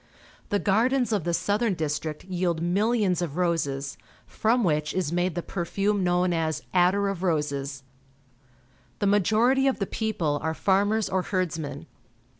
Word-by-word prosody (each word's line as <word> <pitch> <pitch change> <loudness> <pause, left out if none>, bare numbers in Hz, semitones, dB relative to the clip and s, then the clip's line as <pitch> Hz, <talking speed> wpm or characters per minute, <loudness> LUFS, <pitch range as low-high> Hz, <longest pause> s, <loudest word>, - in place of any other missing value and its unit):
The 205 - +2
gardens 235 +6 +2
of 200 -7 0
the 175 - 0
southern 205 +1 0
district 155 0 -3
vield 175 -3 -1
millions 195 +1 +1
of 165 -2 -3
roses, 145 -6 -1 0.3
from 235 +2 +1
which 150 -4 0
is 185 -5 -1
made 175 0 0
the 175 - -2
perfume 195 +2 -1
known 180 0 +2
as 160 -1 -1
attar 185 +3 +3
of 195 -3 -3
roses. 140 -5 -1 1.1
The 205 - -1
majority 220 +7 +3
of 270 - +1
the 195 - -1
people 180 -10 -1
are 160 0 -2
farmers 205 +4 +2
or 185 - 0
herdsmen. 165 -6 -3
180 Hz, 145 wpm, -26 LUFS, 160-205 Hz, 1.1 s, attar